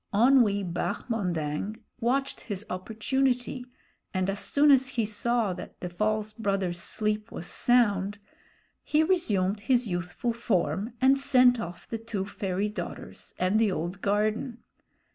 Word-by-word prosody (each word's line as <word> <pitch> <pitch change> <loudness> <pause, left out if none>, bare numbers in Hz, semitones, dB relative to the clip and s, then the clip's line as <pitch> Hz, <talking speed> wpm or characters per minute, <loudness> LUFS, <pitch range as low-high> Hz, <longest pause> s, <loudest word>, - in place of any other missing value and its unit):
Onwee 220 -3 +4
Bahmondang 180 -1 -2 0.2
watched 270 +4 0
his 205 -1 -5
opportunity, 245 +6 -1 0.5
and 185 +1 +1
as 200 - -4
soon 290 +6 +4
as 265 -1 +5
he 235 -4 0
saw 220 -1 0
that 180 - -10
the 180 - -4
false 215 +3 -1
brother's 195 -5 -1
sleep 215 +4 -2
was 175 - -6
sound, 205 -5 +2 0.7
he 305 +1 +3
resumed 215 - +1
his 245 +2 +2
youthful 180 +6 -2
form 200 -2 -1
and 270 +2 +4
sent 250 -3 +5
off 175 -3 -7
the 225 - -4
two 220 -4 -4
fairy 195 0 -2
daughters 210 - -7
and 185 +4 +2
the 220 -3 +3
old 175 +2 -4
garden. 215 +4 0
215 Hz, 135 wpm, -28 LUFS, 190-245 Hz, 0.7 s, as